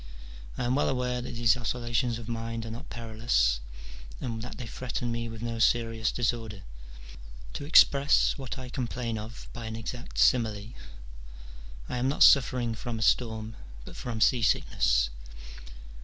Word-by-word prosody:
I -, -, -2 dB
am 120 Hz, +1 st, +1 dB
well 145 Hz, -, +2 dB
aware 125 Hz, -1 st, -1 dB
that 120 Hz, -, -6 dB
these 115 Hz, -2 st, +4 dB
oscillations 120 Hz, 0 st, -1 dB
of 115 Hz, -1 st, -9 dB
mind 115 Hz, 0 st, -4 dB
are 115 Hz, -, -6 dB
not 120 Hz, +6 st, -8 dB
perilous 110 Hz, -, +1 dB, 0.6 s
and 115 Hz, -2 st, -4 dB
that 125 Hz, -, -7 dB
they 125 Hz, -, -6 dB
threaten 120 Hz, 0 st, -4 dB
me 115 Hz, 0 st, -3 dB
with 115 Hz, 0 st, -8 dB
no 115 Hz, -1 st, -3 dB
serious 115 Hz, -1 st, +2 dB
disorder: 115 Hz, -5 st, -2 dB, 0.9 s
to 145 Hz, -, -5 dB
express 140 Hz, -2 st, +5 dB
what 130 Hz, -3 st, -6 dB
I 130 Hz, -1 st, -7 dB
complain 120 Hz, -3 st, -3 dB
of 110 Hz, +2 st, -9 dB
by 115 Hz, -1 st, -6 dB
an 110 Hz, -, -5 dB
exact 120 Hz, +2 st, -7 dB
simile, 110 Hz, -3 st, +2 dB, 1.1 s
I -, -, -3 dB
am 125 Hz, +2 st, 0 dB
not 140 Hz, -, +4 dB
suffering 125 Hz, -4 st, +5 dB
from 115 Hz, 0 st, -5 dB
a 110 Hz, -, -1 dB
storm, 110 Hz, -2 st, +1 dB, 0.3 s
but -, -, -10 dB
from 115 Hz, -3 st, -5 dB
sea 120 Hz, +1 st, +4 dB
sickness. -, -, +2 dB
115 Hz, 155 wpm, -28 LUFS, 110-125 Hz, 1.1 s, express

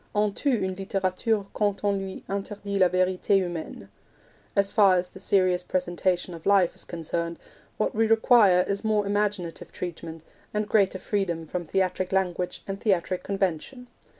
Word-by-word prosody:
On 210 Hz, -1 st, +2 dB
tue 275 Hz, 0 st, +1 dB
une 190 Hz, -, -2 dB
litterature 195 Hz, +2 st, -1 dB
quand 205 Hz, -2 st, -1 dB
on 205 Hz, -1 st, +2 dB
lui 195 Hz, -1 st, -5 dB
interdit 200 Hz, 0 st, -4 dB
la 185 Hz, -, +6 dB
verite 185 Hz, 0 st, 0 dB
humaine. 175 Hz, -, -2 dB, 0.7 s
As 200 Hz, 0 st, +2 dB
far 200 Hz, -4 st, +5 dB
as 180 Hz, 0 st, -1 dB
the -, -, -13 dB
serious 185 Hz, -2 st, +2 dB
presentation 180 Hz, 0 st, -1 dB
of 165 Hz, +1 st, -8 dB
life 195 Hz, -3 st, +4 dB
is -, -, -9 dB
concerned, 170 Hz, 0 st, -4 dB, 0.4 s
what 215 Hz, -, 0 dB
we 225 Hz, +1 st, +2 dB
require 220 Hz, -5 st, +5 dB
is 200 Hz, 0 st, -2 dB
more 215 Hz, -2 st, +1 dB
imaginative 205 Hz, -4 st, -2 dB
treatment, 165 Hz, -2 st, -7 dB, 0.5 s
greater 195 Hz, -3 st, +3 dB
freedom 185 Hz, -5 st, -2 dB
from 175 Hz, +2 st, -4 dB
theatric 185 Hz, +1 st, -1 dB
language 180 Hz, -2 st, -1 dB
and 195 Hz, 0 st, -5 dB
theatric 185 Hz, -3 st, 0 dB
convention. 195 Hz, -, -3 dB
190 Hz, 150 wpm, -26 LUFS, 180-200 Hz, 0.7 s, la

